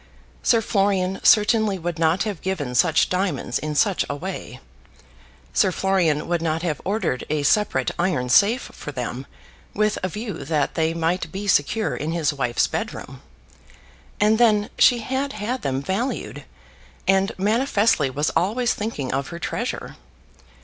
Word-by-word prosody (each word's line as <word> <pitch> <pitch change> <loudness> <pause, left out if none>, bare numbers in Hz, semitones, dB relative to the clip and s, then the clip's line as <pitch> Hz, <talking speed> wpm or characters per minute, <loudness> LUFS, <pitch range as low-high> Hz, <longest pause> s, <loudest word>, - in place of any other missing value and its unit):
Sir 230 -2 +3
Florian 195 -3 0
certainly 215 -1 +4
would 170 -1 -4
not 165 +3 +2
have 205 -7 -4
given 165 -10 -3
such 160 +4 +3
diamonds 185 +1 -1
in 150 0 -4
such 195 +5 +2
a 140 - -2
way. 145 - -6 0.9
Sir 190 - +3
Florian 180 -6 +1
would 170 -1 0
not 165 0 -1
have 155 -5 -2
ordered 195 - -1
a 150 -1 0
separate 145 -7 +2
iron 170 -9 0
safe 210 - +4
for 145 - -7
them, 125 0 -5 0.5
with 215 0 +1
a 185 - 0
view 210 -5 -6
that 150 0 0
they 160 0 0
might 170 0 -1
be 195 +2 -5
secure 205 +4 +1
in 155 +3 -3
his 160 -4 0
wife's 125 -4 +1
bed - - -3
room. - - -10 1.0
And 215 +2 +3
then 215 -3 +3
she 240 -2 +5
had 265 +4 -2
had 215 +5 -3
them 135 0 -2
valued, 215 - -3 0.6
and 195 +2 +3
manifestly 210 - +2
was 145 +4 -1
always 225 +8 +1
thinking 205 - -4
of 135 0 -1
her 170 - -7
treasure. 170 - -4
185 Hz, 155 wpm, -23 LUFS, 150-210 Hz, 1.0 s, she